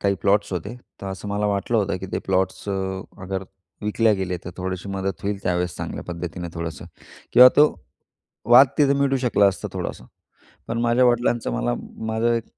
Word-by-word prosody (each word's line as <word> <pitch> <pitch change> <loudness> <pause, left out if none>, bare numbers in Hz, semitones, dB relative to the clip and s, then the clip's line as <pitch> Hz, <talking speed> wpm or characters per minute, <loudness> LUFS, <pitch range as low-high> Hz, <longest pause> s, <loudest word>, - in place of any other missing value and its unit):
काही 100 -1 +2
प्लॉट्स 100 0 +2
होते, 95 +6 -4 0.3
तर 100 - -5
असं 95 +2 -6
मला 105 +1 -1
वाटलं 100 +3 0
होतं, 100 -2 0
की 95 - -6
ते - - 0
प्लॉट्स 95 +1 0
अ, 100 - 0 0.5
अगर 95 +1 -4 0.4
विकले 105 +1 +2
गेले, 95 -2 -2
तर 90 - -6
थोडीशी 95 +1 -4
मदत 95 -2 -3
होईल 100 0 -3
त्यावेळेस 90 0 -1
चांगल्या - - -5
पद्धतीनं 85 0 -5
थोडंसं. 80 -3 -5 0.5
किंवा 125 0 +10
तो 150 +1 +8 0.8
वाद 130 +3 +9
तिथे 140 -2 +5
मिटू 135 -1 +2
शकला 105 -3 +4
असता 95 - -4
थोडासा. - - -5 0.6
पण 115 - -2
माझ्या 120 +2 +3
वडिलांचं 120 - +1
मला - - 0 0.3
माझं 110 +2 +1
एक 115 - -2
100 Hz, 175 wpm, -23 LUFS, 90-115 Hz, 0.8 s, किंवा